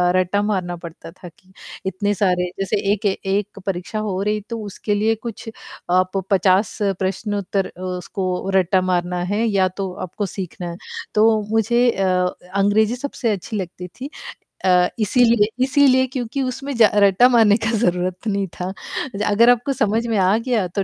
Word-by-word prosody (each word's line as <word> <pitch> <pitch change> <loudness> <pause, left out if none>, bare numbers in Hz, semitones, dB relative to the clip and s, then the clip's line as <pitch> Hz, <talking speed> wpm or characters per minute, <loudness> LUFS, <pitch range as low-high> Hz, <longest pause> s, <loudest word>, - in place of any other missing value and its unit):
रट्टा 185 +2 +1
मारना 190 -4 -1
पड़ता 170 -1 -10
था 180 +1 -13
कि, 185 +3 -27 0.3
इतने 205 +2 -1
सारे 180 -2 +1
जैसे 195 +2 0
एक 210 +1 -1
ए 195 -1 +1
एक 200 +1 -2
परीक्षा 190 +3 -3
हो 195 -3 -2
रही, 210 +1 0
तो 230 - -4
उसके 205 +1 -3
लिए 220 +2 +2
कुछ 225 0 -7 0.4
आप 185 +1 +2
50 190 +1 +3 0.2
प्रश्न-उत्तर 195 0 -2
अ, 185 - -10
उसको 185 +1 -3
रट्टा 185 0 +3
मारना 180 -1 -1
है 220 +3 +1
या 195 -4 +2
तो 190 0 -5
आपको 195 +4 -4
सीखना 180 -2 -6
है। 170 - -8 0.4
तो 215 0 +4
मुझे 235 +3 +3
अ 195 - -2
अ, 180 -1 +2 0.3
अंग्रेज़ी 205 +3 +3
सबसे 250 -3 -2
अच्छी 210 +2 -4
लगती 180 -1 -6
थी 255 +10 -9 0.6
अ, 180 -1 +5
इसीलिए 230 0 +4 0.2
इसीलिए 260 -1 +4
क्योंकि 255 +1 -3
उसमें 270 +2 -3
ज 220 -3 +6
रट्टा 205 +4 +5
मारने 225 -4 +5
का 220 - +1
ज़रूरत 180 0 -1
नहीं 200 -2 0
था। 180 - -2
अ, 215 +4 -6
अगर 230 +4 +5
आपको 245 +3 +2
समझ 225 -1 0
में 225 -2 0
आ 190 +2 +3
गया 230 -5 0
तो 195 +3 -2
200 Hz, 175 wpm, -20 LUFS, 185-225 Hz, 0.6 s, ज